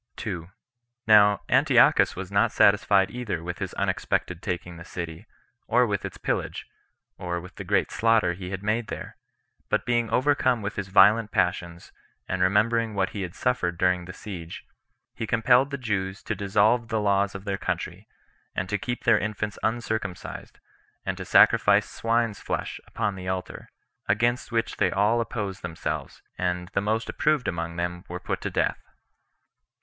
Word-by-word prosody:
Now 105 -2 +6
Antiochus - - +4
was 95 +1 -6
not 100 0 +3
satisfied 100 -1 +4
either 105 -9 -4
with 90 +1 -5
his - - -4
unexpected 90 -1 -1
taking 90 -3 -4
the 85 - -9
city, 85 +4 -7 0.4
or 125 +2 +4
with 100 -4 -2
its - - -7
pillage, - - -3 0.5
or 85 -1 -3
with 90 +2 -11
the - - -5
great - - +1
slaughter 115 -5 +3
he 90 +1 -7
had 95 +1 -5
made 110 +2 0
there; - - -7 0.5
but - - 0
being 120 -2 +1
overcome 130 -4 +2
with 100 +1 -4
his 100 -2 -4
violent 105 +3 +5
passions, 90 -3 -1 0.4
and 95 0 -2
remembering 110 +4 +2
what 95 -1 0
he 100 - -5
had 90 -1 -5
suffered 95 -9 0
during 90 0 +1
the 90 - -7
siege, 90 -5 -8 0.5
he 115 - -5
compelled 125 +4 +4
the 140 - -3
Jews 100 -5 -3
to - - -2
dissolve 105 +4 +2
the 110 0 -1
laws 100 -1 +1
of 95 +1 -7
their 100 -1 -2
country, - - -4 0.5
and 90 - -2
to 105 -1 -1
keep 120 +5 -4
their 115 -3 +5
infants 105 0 -3
uncircumcised, 110 -5 -3 0.5
and - - -1
to - - -7
sacrifice - - +5
swine's 115 -2 0
flesh - - -4
upon 100 - -2
the 90 -1 -8
altar; 95 0 -4 0.4
against 120 +5 +1
which 115 0 -1
they 95 - +3
all 105 +6 +2
opposed 105 -5 -4
themselves, 85 -2 -5 0.2
and 90 -1 -1
the 100 - -1
most 110 +2 -1
approved 150 -4 +1
among 85 -1 -3
them 85 0 -3
were 90 0 -5
put - - -4
to - - -2
death. - - 0
100 Hz, 165 wpm, -26 LUFS, 90-115 Hz, 0.5 s, Now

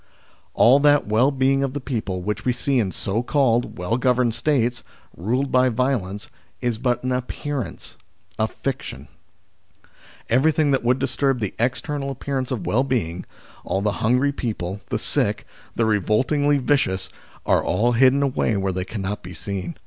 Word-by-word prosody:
All 130 +4 +6
that 145 0 +4
well 110 +6 +3
being 135 0 +2
of 135 -1 -1
the 145 - -3
people 110 -9 -3
which 105 +1 -3
we 125 - +2
see 135 +2 0
in 100 -5 0
so 100 +6 -1
called 125 -3 +1
well 90 +6 -1
governed 125 -2 +2
States, 120 -2 0 0.3
ruled 125 +10 -1
by 130 0 +4
violence, 115 -5 -1 0.3
is 120 -3 -1
but 125 -1 0
an 130 - -1
appearance 130 +1 -4 0.4
a 110 - +2
fiction. 135 +3 -5 1.2
Everything 145 +4 +3
that 135 - +1
would 125 +2 +3
disturb 135 0 0
the 105 -4 -3
external 135 +4 -1
appearance 135 -1 -3
of 125 -5 -3
well 130 +5 +2
being 100 -10 -2 0.4
all 95 - -1
the 105 - +2
hungry 125 +5 +3
people, 105 -7 -4
the - - 0
sick, - - 0 0.3
the 115 - +2
revoltingly 130 +8 +2
vicious 130 -8 +1 0.4
are - - +3
all 115 +7 +1
hidden 130 +3 +4
away 130 -5 0
where 95 -1 -1
they 90 0 -3
cannot 100 -1 -4
be 90 0 -9
seen. 90 0 -5
125 Hz, 160 wpm, -22 LUFS, 105-135 Hz, 1.2 s, All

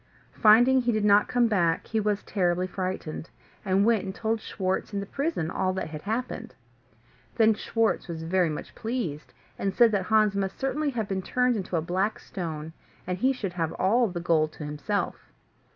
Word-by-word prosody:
Finding 245 +5 +6
he 240 -1 +1
did 215 -2 0
not 205 0 +5
come 245 -1 +2
back, 175 -7 +1
he 220 - -1
was 210 -1 0
terribly 180 -2 0
frightened, 185 -4 -4 0.3
and 195 0 +2
went 225 -3 +3
and 190 0 -5
told 225 0 -1
Schwartz 190 +1 -2
in - - 0
the 200 - -4
prison 275 - -2
all 185 0 0
that 185 -4 -4
had 155 -1 -6
happened. 225 +2 -4 0.8
Then 220 -1 +5
Schwartz 225 0 0
was 165 -2 -5
very 175 +1 +2
much 150 - -6
pleased, 220 - -4 0.3
and 195 -1 -1
said 235 -2 +6
that 195 -3 0
Hans 215 -1 +3
must 195 -1 -2
certainly 290 +3 0
have 230 -6 -2
been 195 -1 -2
turned 250 +5 +1
into 190 -3 -3
a 160 - -1
black 190 +5 0
stone, 160 -4 -6 0.3
and 180 0 -3
he 260 +5 +3
should 205 -9 -4
have 165 -3 -2
all 230 +6 +2
the 180 -3 -4
gold 160 -3 +1
to 150 - -7
himself. 150 +8 -3
200 Hz, 190 wpm, -27 LUFS, 175-225 Hz, 0.8 s, Finding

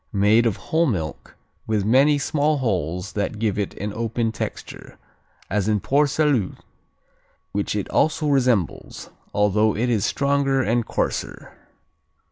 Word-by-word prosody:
Made 105 +3 +3
of 110 - -1
whole 165 +1 0
milk, 80 - -4 0.3
with 105 -3 0
many 135 +6 +4
small 150 +1 +1
holes 90 - -2
that 105 +1 -2
give 105 -2 -1
it 100 - -3
an 105 +1 -5
open 115 0 -1
texture, - - -7 0.5
as 100 +1 -1
in 105 -1 +2
Port 145 +7 +2
Salut, 140 -10 +1 1.0
which 100 +1 -2
it 105 - -2
also 155 0 +1
resembles, 125 - 0 0.2
although 105 +1 +2
it 120 +2 0
is 110 -4 +1
stronger 140 -1 +1
and 115 +1 0
coarser. - - -3
110 Hz, 135 wpm, -22 LUFS, 100-135 Hz, 1.0 s, many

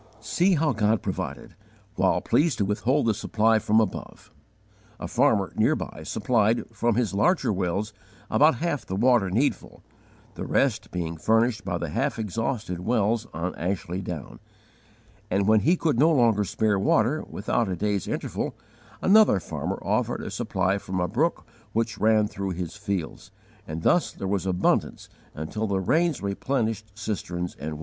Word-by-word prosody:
See 175 - +2
how 155 -2 +1
God 110 -1 +1
provided, - - -5 0.4
while - - +2
pleased 160 0 +2
to 100 - +1
withhold 120 +8 +1
the 115 - +3
supply 110 +2 +2
from 110 +1 +3
above! 110 - -4 0.7
A - - -4
farmer, - - +2
near - - +3
by, - - -6
supplied, 110 0 +1
from 115 0 0
his 115 -4 0
larger 125 - +2
wells, 100 +3 -2 0.3
about 150 -1 +4
half 150 +1 -2
the 95 - -5
water 115 -2 +3
needful, 120 +10 -1 0.5
the - - -6
rest - - +1
being 85 -2 -4
furnished 115 +7 +2
by - - -2
the - - -4
half - - -1
exhausted 110 -3 -3
wells 110 +3 0
on 85 +3 -3
Ashley 90 0 -3
Down; 85 -7 -7 0.9
and, 100 +1 +1
when 110 0 +5
he 165 - +3
could 155 -9 0
no 155 +4 +6
longer 115 -8 +3
spare 105 +1 +1
water, 115 +9 +2
without 110 +2 -1
a 90 - -1
day's 100 +1 -1
interval, - - -3 0.5
another 205 - +6
farmer - - -4
offered - - -1
a - - -5
supply 95 +1 0
from 95 -1 -4
a 90 - +1
brook 155 - 0 0.3
which 115 0 -1
ran 110 -1 +3
through 95 -2 -4
his 90 0 -5
fields, 100 -3 -4 0.4
and 80 +1 -5
thus 175 - +3
there 95 - -6
was 95 -1 -1
abundance 90 -1 0 0.3
until 90 +9 -3
the 100 -1 0
rains 155 - +1
replenished 110 +1 -2
cisterns 90 -5 -4
and 75 +2 -4
wells. 75 - -8
105 Hz, 160 wpm, -25 LUFS, 95-120 Hz, 0.9 s, no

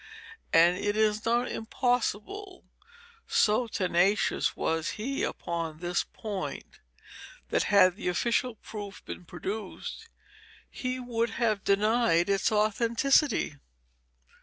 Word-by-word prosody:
And 170 +3 +5
it 205 +1 -1
is 215 0 +2
not 240 +2 +2
impossible, 250 - -2 0.6
so 220 +3 +3
tenacious 190 0 +1
was 160 +3 0
he 265 +6 -3
upon 165 -2 -3
this 175 +1 -1
point, 205 -4 -6 0.7
that - - +1
had 195 -2 +5
the 210 - -5
official 235 +6 0
proof 205 -2 -9
been 180 - -8
produced, 200 - -6 0.6
he 255 0 -3
would 235 -2 -1
have 215 -5 +1
denied 200 -3 +3
its 195 +2 +2
authenticity. 230 - +2
210 Hz, 105 wpm, -28 LUFS, 185-235 Hz, 0.7 s, And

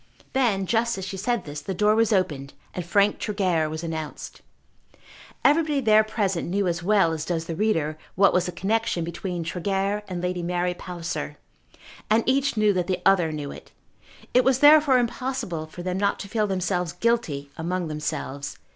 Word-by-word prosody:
Then 225 -8 +2
just 235 +2 +1
as 190 - -4
she 190 - -5
said 235 +4 -1
this 150 0 -6
the 190 +6 -4
door 210 +3 +3
was 225 0 +2
opened 150 -9 0 0.2
and 180 - -4
Frank 200 +4 +2
Tregear 185 -7 0
was 155 +2 -5
announced. 160 -2 -6 1.0
Everybody 300 -1 +3
there 215 -4 +5
present 200 -6 -1
knew 195 +1 0
as 175 0 -1
well 195 -2 +3
as 160 -2 -3
does 165 -1 -2
the 165 - -4
reader, 160 -6 0 0.2
what 195 +2 +5
was 180 0 +2
the - - -3
connexion 195 -1 -1
between 170 +1 -4
Tregear 195 +4 -1
and 180 -2 -4
Lady 180 0 -2
Mary 175 +1 -1
Palliser. 175 -1 -5 0.7
And 220 +2 +4
each 270 -1 +1
knew 210 -1 +4
that 180 -2 -1
the 185 -1 -2
other 175 -5 +4
knew 150 -2 -5
it. - - -12 0.6
It 250 - +5
was 265 -1 +3
therefore 290 -1 +7
impossible 235 -9 -2
for 175 +3 -9
them 185 +1 -2
not 200 0 +1
to - - -7
feel 215 0 0
themselves 180 -3 -1
guilty 175 -10 -1
among 175 +1 -2
themselves. 150 -2 -4
185 Hz, 180 wpm, -25 LUFS, 170-215 Hz, 1.0 s, therefore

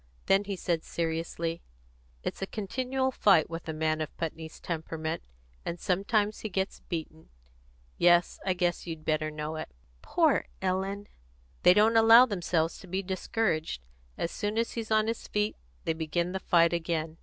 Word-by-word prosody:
Then 195 +1 +3
he 200 -1 -3
said 170 -3 -1
seriously: 165 0 -2 0.6
"It's - - -4
a 195 - -2
continual 260 +6 -1
fight 195 - +4
with 165 0 -6
a - - +1
man 155 0 0
of 155 - -5
Putney's 160 -1 -5
temperament, 160 -1 -3 0.4
and 170 - -4
sometimes 205 +3 +1
he 215 - -4
gets 190 0 -2
beaten. 160 -2 -6 0.7
Yes, 175 0 +4
I 190 - +1
guess 175 -1 -1
you'd 160 -2 -6
better 155 0 +1
know 155 +1 -4
it." - - -5 0.3
"Poor - - +2
Ellen!" 190 +2 -1 0.6
"They 180 - +7
don't 220 +2 +5
allow 225 +2 +9
themselves 175 -6 -1
to 190 - -12
be 190 +2 -2
discouraged. 180 - -1 0.3
As 170 - -2
soon 210 +1 -2
as 230 0 +1
he's 225 -2 -5
on 215 -1 +3
his 225 +1 -3
feet 210 0 0 0.3
they 165 - 0
begin 170 +2 -1
the 190 - -2
fight 170 -2 +4
again. 165 -1 -2
175 Hz, 165 wpm, -29 LUFS, 160-205 Hz, 0.7 s, allow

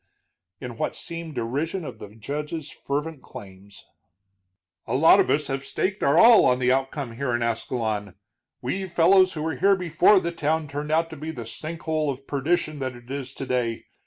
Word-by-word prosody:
in 120 -3 -7
what - - -2
seemed 165 -2 -6
derision 145 +9 -2
of - - -8
the 105 - -8
judge's 150 +6 -5
fervent 145 +1 -4
claims. 100 0 -12 1.0
"A 115 - -1
lot 160 +5 +6
of - - +2
us 150 +1 +2
have 135 0 -3
staked 190 +6 -2
our 140 +3 +3
all 230 +3 +8
on 125 - +3
the 125 0 +2
outcome 135 0 -1
here 130 -2 -1
in 120 - -1
Ascalon, 110 -3 -2 0.5
we 190 0 -2
fellows 185 +2 +4
who 155 -2 -4
were 160 -4 -2
here 195 +5 +4
before 180 +2 +4
the 170 -1 -3
town 160 -1 -1
turned 145 +2 -5
out 165 +1 +1
to - - -7
be 155 +2 -6
the 120 -7 -6
sink 160 +8 -6
hole 155 -2 0
of 135 0 -5
perdition 150 +2 -1
that 130 -2 -3
it 120 +1 -13
is 135 -2 -4
today. 125 -4 -2
145 Hz, 190 wpm, -25 LUFS, 125-165 Hz, 1.0 s, all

